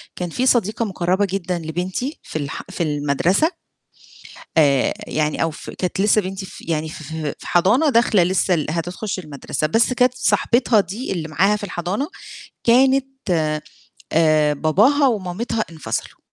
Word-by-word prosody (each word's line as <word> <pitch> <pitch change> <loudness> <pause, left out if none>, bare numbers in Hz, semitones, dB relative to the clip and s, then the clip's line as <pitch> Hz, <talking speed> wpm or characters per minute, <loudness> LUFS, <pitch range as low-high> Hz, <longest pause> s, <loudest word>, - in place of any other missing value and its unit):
كان 180 -1 -4
فيه 250 +10 -1
صديقة 230 -2 +2
مُقرَّبة 190 0 0
جدًا 180 -2 -2
لبنتي 180 - -4
في 155 - -5
الح 140 -2 -5
في 190 -2 -2
المَدرسة. 155 - +1 1.1
آآ 140 -4 +4
يعني 155 +1 0
أو 165 - 0
في 155 - -9
كانت 185 0 -3
لسه 210 +1 +4
بنتي 190 +1 -5
في 190 - -12
يعني 160 -1 -2
ف 155 - -9 0.3
في - - -11
حضانة 215 - +3
داخلة 230 -7 +4
لسه 185 +1 +1
ال 155 -3 0
هتخش 175 +5 -3
المَدرسة، 150 -1 -3
بس 225 +9 +2
كانت 250 0 +3
صاحبتها 240 -2 +2
دي 205 +6 -3
اللي 170 -4 -3
معاها 185 +7 +2
في 210 - -7
الحضانة 190 - -3 0.6
كانت 265 +3 +4 1.1
آآ 155 -2 +3
باباها 215 - +3
ومامتها 215 +1 -2
انفصلوا، 160 -2 -5
185 Hz, 145 wpm, -21 LUFS, 160-225 Hz, 1.1 s, آآ